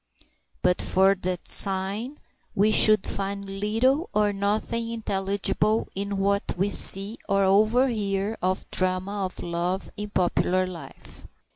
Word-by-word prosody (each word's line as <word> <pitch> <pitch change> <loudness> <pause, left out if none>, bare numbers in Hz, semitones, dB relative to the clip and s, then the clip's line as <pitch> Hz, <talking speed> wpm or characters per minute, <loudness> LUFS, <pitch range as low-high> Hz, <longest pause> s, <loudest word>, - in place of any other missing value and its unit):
But 180 0 +2
for 190 +1 +2
that 180 -2 -5
sign 200 +8 0 0.4
we 210 +2 +3
should 215 -2 +6
find 200 0 -4
little 225 - -1
or 210 -1 +1
nothing 215 +3 -2
intelligible 205 0 -2
in 200 +1 -4
what 200 0 -1
we 195 +3 0
see 200 +3 +5
or 195 0 +2
overhear 210 0 +1
of 185 +1 -1
the - - -2
drama 185 +2 -1
of 185 - -11
love 175 +2 -3
in 210 0 -6
popular 185 0 0
life. 165 -7 -11
200 Hz, 130 wpm, -24 LUFS, 190-215 Hz, 0.4 s, should